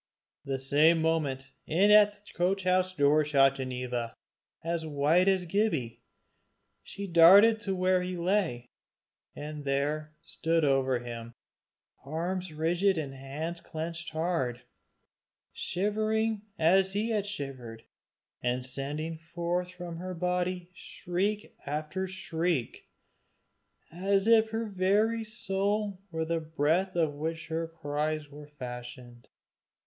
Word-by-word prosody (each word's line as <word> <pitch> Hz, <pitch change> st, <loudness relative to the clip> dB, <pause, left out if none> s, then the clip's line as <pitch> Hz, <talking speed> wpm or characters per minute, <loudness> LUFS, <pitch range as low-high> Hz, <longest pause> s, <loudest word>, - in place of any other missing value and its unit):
The 135 Hz, -1 st, -1 dB
same 150 Hz, +5 st, +4 dB
moment, 145 Hz, -5 st, -1 dB, 0.2 s
in 190 Hz, +6 st, +4 dB
at 210 Hz, -1 st, +7 dB
the 205 Hz, 0 st, -18 dB
coach 185 Hz, +2 st, 0 dB
house 185 Hz, 0 st, +2 dB
door 150 Hz, 0 st, +4 dB
shot 135 Hz, -2 st, +4 dB
Ginevra, 125 Hz, -3 st, -3 dB, 0.5 s
as 165 Hz, 0 st, -1 dB
white 155 Hz, +4 st, +2 dB
as 190 Hz, -2 st, +3 dB
Gibbie. 160 Hz, -, -1 dB, 0.8 s
She 200 Hz, -, -7 dB
darted 195 Hz, +6 st, +7 dB
to 195 Hz, -3 st, -2 dB
where 185 Hz, 0 st, +2 dB
he 180 Hz, 0 st, -4 dB
lay, 170 Hz, -10 st, 0 dB, 0.6 s
and 150 Hz, 0 st, -6 dB
there 150 Hz, +3 st, -1 dB
stood 165 Hz, -1 st, 0 dB
over 135 Hz, -2 st, +2 dB
him, 120 Hz, -1 st, -8 dB, 0.7 s
arms 175 Hz, +5 st, -3 dB
rigid 170 Hz, +5 st, +1 dB
and 145 Hz, -4 st, -3 dB
hands 150 Hz, +6 st, -5 dB
clenched 165 Hz, +2 st, -5 dB
hard, 155 Hz, -7 st, -2 dB, 0.9 s
shivering 215 Hz, +3 st, 0 dB, 0.2 s
as 190 Hz, +4 st, +4 dB
he 215 Hz, +3 st, 0 dB
had 205 Hz, -2 st, 0 dB
shivered, 130 Hz, -, -7 dB, 0.6 s
and 125 Hz, +1 st, -1 dB
sending 150 Hz, +5 st, -4 dB, 0.2 s
from 175 Hz, 0 st, -3 dB
her 185 Hz, +1 st, -5 dB
body 180 Hz, 0 st, -1 dB
shriek 195 Hz, +4 st, -3 dB
after 155 Hz, +6 st, -3 dB
shriek, 170 Hz, -7 st, -2 dB, 1.0 s
as 195 Hz, +3 st, +1 dB
if 225 Hz, -1 st, +5 dB
her 225 Hz, +1 st, -2 dB
very 210 Hz, +3 st, +1 dB
soul 205 Hz, -2 st, -1 dB
were 160 Hz, -2 st, -2 dB
the 165 Hz, +1 st, 0 dB
breath 160 Hz, +4 st, 0 dB
of 160 Hz, -4 st, +1 dB
which 160 Hz, +3 st, -4 dB
her 165 Hz, +1 st, -2 dB
cries 155 Hz, -1 st, -3 dB
were 145 Hz, 0 st, -11 dB
fashioned. 125 Hz, -3 st, -9 dB
165 Hz, 120 wpm, -29 LUFS, 145-190 Hz, 1.0 s, at